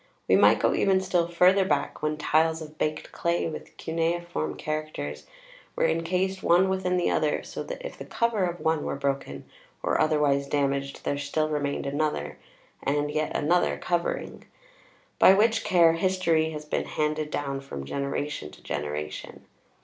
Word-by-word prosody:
We - - +5
might - - +6
go - - +2
even 190 -1 +3
still 180 -3 +1
further 180 +3 +4
back, 150 -6 -1
when 155 0 -1
tiles 160 +1 +2
of 155 -1 -10
baked 155 0 -2
clay 170 0 0
with 160 - -8
cuneiform 165 - -2
characters 150 - -4 0.5
were - - +2
incased 180 +4 0
one 180 +3 +4
within 185 -1 0
the 175 - +1
other, 150 -1 +1
so - - -6
that - - -6
if - - -7
the - - -7
cover 230 -5 0
of 175 0 -4
one 160 -1 0
were - - -2
broken 140 0 -3 0.4
or - - +1
otherwise 150 -3 +2
damaged 140 -1 -1
there 145 - -1
still 155 +2 -1
remained 145 -2 -2
another, 150 +2 -2 0.4
and 145 +1 0
yet 155 +1 -1
another 175 +4 +2
covering; 175 -1 -2 0.7
by 190 - +8
which 225 +2 +3
care 170 -3 +5
history 165 -3 +1
has 150 -1 -7
been 150 - -2
handed 155 0 -1
down 140 -2 -3
from 70 - -7
generation 140 - -3
to - - -17
generation. 75 +1 -5
155 Hz, 160 wpm, -27 LUFS, 145-175 Hz, 0.7 s, by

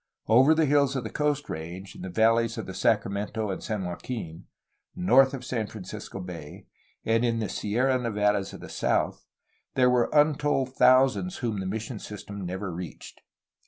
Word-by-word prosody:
Over 130 +8 +6
the 160 0 +3
hills 140 -1 +3
of 130 - -2
the 110 - -6
Coast 150 -1 0
Range, 85 +5 -7
in - - -10
the 95 - -5
valleys 115 +3 +2
of 115 - -4
the 95 - -7
Sacramento 105 0 0
and 95 - -5
San 105 -4 -3
Joaquin, 90 -2 -6 0.5
north 135 -8 +5
of 125 -1 -8
San 115 -4 -2
Francisco 100 -1 -8
Bay, 85 -5 -8 0.4
and 115 +1 +2
in 115 -1 +1
the 110 -2 -1
Sierra 125 +7 0
Nevadas 105 -4 0
of - - -10
the - - -8
south - - -1 0.5
there 125 -1 +4
were 125 -1 +2
untold 145 -3 +2
thousands 135 +8 +4
whom 115 -5 -2
the 95 - -3
mission 110 +3 -4
system 100 -1 -8
never 95 +1 -4
reached. 85 -1 -8
110 Hz, 170 wpm, -27 LUFS, 100-130 Hz, 0.5 s, Over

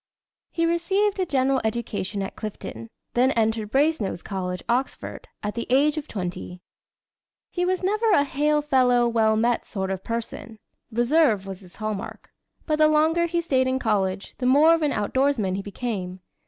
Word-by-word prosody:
He 335 - 0
received 385 +5 +1
a 370 - 0
general 265 -2 +1
education 215 -3 -2
at 190 - -6
Clifton, 115 - -7 0.2
then 250 +2 +3
entered 220 -1 0
Brasenose 270 - +1
College, 180 -2 -4
Oxford, 250 +3 -2 0.2
at 210 0 -2
the 235 - -4
age 285 +4 +3
of 310 -1 -5
twenty. 180 -2 -5 0.9
He 355 0 -1
was 370 +1 -1
never 430 +4 +1
a 340 -9 +5
"hail 295 +2 +1
fellow 250 -4 +3
well 220 -2 +2
met" 235 +2 +1
sort 190 -2 -3
of 190 -1 -4
person. 230 -1 -5 0.3
Reserve 240 -3 +2
was 195 -1 -7
his 180 -3 -17
hallmark. 215 -2 -5 0.3
But 305 -1 0
the 310 0 +5
longer 320 +3 +3
he 340 0 0
stayed 260 -6 +1
in 260 0 +1
college, 200 -5 -1
the 250 - 0
more 295 +5 +6
of 330 - +1
an 295 -2 +1
outdoorsman 225 -2 0
he 195 - -3
became. 195 -3 -5
245 Hz, 165 wpm, -24 LUFS, 205-300 Hz, 0.9 s, more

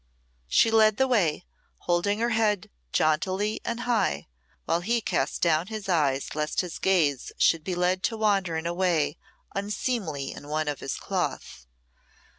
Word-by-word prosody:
She 225 - +4
led 215 -2 +5
the 265 - +3
way, 180 -10 +1 0.4
holding 175 +4 +1
her 235 +2 +1
head 215 -3 +1 0.2
jauntily 185 +7 +1
and 235 +1 -3
high, 225 - 0 0.4
while 170 - +1
he 235 +6 +1
cast 140 -10 -1
down 165 0 +2
his 215 -2 -6
eyes 145 -7 +1
lest 150 0 -1
his 180 -3 -6
gaze 160 -9 +1
should 165 -2 +3
be 185 +1 -2
led 180 +1 +1
to 225 - -1
wander 195 -6 +1
in 160 - -4
a 170 - -1
way 175 -5 +1 0.3
unseemly 200 - -2
in 145 - -10
one 155 +1 -1
of 145 -1 -2
his 135 - -3
cloth. - - -4
180 Hz, 160 wpm, -26 LUFS, 155-215 Hz, 0.4 s, led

